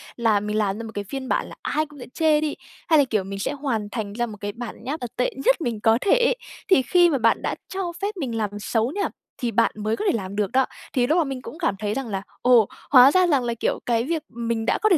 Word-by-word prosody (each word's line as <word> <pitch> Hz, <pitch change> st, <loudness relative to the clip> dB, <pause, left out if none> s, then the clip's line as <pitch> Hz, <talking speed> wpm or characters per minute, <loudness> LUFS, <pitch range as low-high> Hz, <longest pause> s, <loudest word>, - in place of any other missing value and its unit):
là 225 Hz, -3 st, +2 dB
mình 210 Hz, +1 st, -2 dB
làm 205 Hz, -2 st, 0 dB
ra 230 Hz, -, -6 dB
một 225 Hz, -, -7 dB
cái 205 Hz, -, -3 dB
phiên 260 Hz, +5 st, -6 dB
bản -, -, 0 dB
là -, -, -10 dB
ai 310 Hz, -, 0 dB
cũng 295 Hz, -2 st, -15 dB
sẽ -, -, -7 dB
chê 310 Hz, -2 st, +3 dB
đi, 305 Hz, -1 st, -1 dB, 0.3 s
hay 315 Hz, -3 st, +5 dB
là 285 Hz, -, +5 dB
kiểu 215 Hz, -6 st, 0 dB
mình 195 Hz, +1 st, -6 dB
sẽ 200 Hz, -, -1 dB
hoàn 260 Hz, -8 st, -2 dB
thành 215 Hz, -4 st, -4 dB
ra 240 Hz, +2 st, -1 dB
một 215 Hz, -3 st, -9 dB
cái 205 Hz, 0 st, -3 dB
bản 230 Hz, 0 st, -8 dB
nháp, 285 Hz, +6 st, -3 dB
à, 245 Hz, -, -4 dB
tệ 250 Hz, -, 0 dB
nhất -, -, +4 dB
mình 235 Hz, -7 st, -2 dB
có 225 Hz, +1 st, +4 dB
thể 400 Hz, -, +1 dB
ấy. -, -, +3 dB, 0.3 s
Thì 375 Hz, -8 st, +6 dB
khi 350 Hz, +6 st, +4 dB
mà 290 Hz, -, +1 dB
bạn 230 Hz, -2 st, +2 dB
đã -, -, -2 dB
cho 375 Hz, -2 st, -3 dB
phép 405 Hz, +1 st, -2 dB
mình 260 Hz, -9 st, -3 dB
làm 210 Hz, -2 st, 0 dB
xấu 225 Hz, +3 st, 0 dB
nha, 400 Hz, +5 st, -1 dB, 0.3 s
thì 240 Hz, -2 st, -2 dB
bạn 230 Hz, 0 st, +3 dB
mới 215 Hz, +1 st, -1 dB
có 425 Hz, -, -4 dB
thể -, -, +4 dB
làm 195 Hz, -1 st, -6 dB
được 205 Hz, 0 st, 0 dB
đó. 260 Hz, +1 st, +3 dB, 0.3 s
Thì 245 Hz, -2 st, +2 dB
lúc 315 Hz, -, +3 dB
mà 345 Hz, -, +4 dB
mình 270 Hz, -3 st, -5 dB
cũng 305 Hz, -, -9 dB
cảm 330 Hz, -, 0 dB
thấy 210 Hz, 0 st, -1 dB
rằng 270 Hz, 0 st, -3 dB
là 195 Hz, -3 st, -3 dB, 0.2 s
"Ồ! 245 Hz, -4 st, +5 dB, 0.2 s
Hóa 260 Hz, 0 st, +9 dB
ra 370 Hz, +1 st, +4 dB
rằng 280 Hz, -6 st, +2 dB
là, 235 Hz, -1 st, -1 dB
kiểu, 230 Hz, -, -1 dB
cái 230 Hz, -1 st, +1 dB
việc, 320 Hz, +3 st, -2 dB
ừm, 235 Hz, -1 st, -4 dB
mình 225 Hz, -1 st, -1 dB
đã -, -, +2 dB
có 430 Hz, -, +4 dB
thể 365 Hz, -, +5 dB
245 Hz, 295 wpm, -23 LUFS, 220-300 Hz, 0.3 s, Hóa